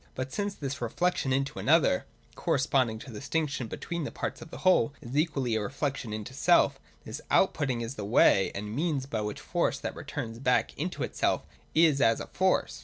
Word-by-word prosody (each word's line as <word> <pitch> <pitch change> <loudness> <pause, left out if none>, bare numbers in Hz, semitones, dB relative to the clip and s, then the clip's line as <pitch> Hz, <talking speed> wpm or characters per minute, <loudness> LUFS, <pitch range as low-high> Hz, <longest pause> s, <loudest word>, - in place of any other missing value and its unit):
But 130 +1 -4
since 205 -1 -2
this 140 -1 -5
reflection 140 +4 0
into 135 +1 0
another 150 - +3 0.3
(corresponding 130 -7 +1
to 130 - -9
the 105 - -7
distinction 145 -3 -2
between 170 +8 -4
the - - -3
Parts - - -4
of 160 - -10
the - - -10
Whole) 150 -7 +4
is 125 +3 -8
equally 145 -6 +1
a 110 - +1
reflection 135 +1 -3
into 110 +3 -5
self, 175 +6 +3 0.3
this - - -6
out 190 - +4
putting 130 -5 -1
is 115 +2 -4
the 105 - -6
way 100 -2 +4
and 105 +2 -4
means 150 -3 0
by 115 -5 -3
which 105 0 -4
Force - - 0
that - - -4
returns 115 0 -6
back 125 -1 +1
into - - -3
itself - - 0 0.3
is 155 -4 +5
as 115 0 +4
a - - -5
Force. 185 0 0
135 Hz, 195 wpm, -29 LUFS, 115-155 Hz, 0.3 s, is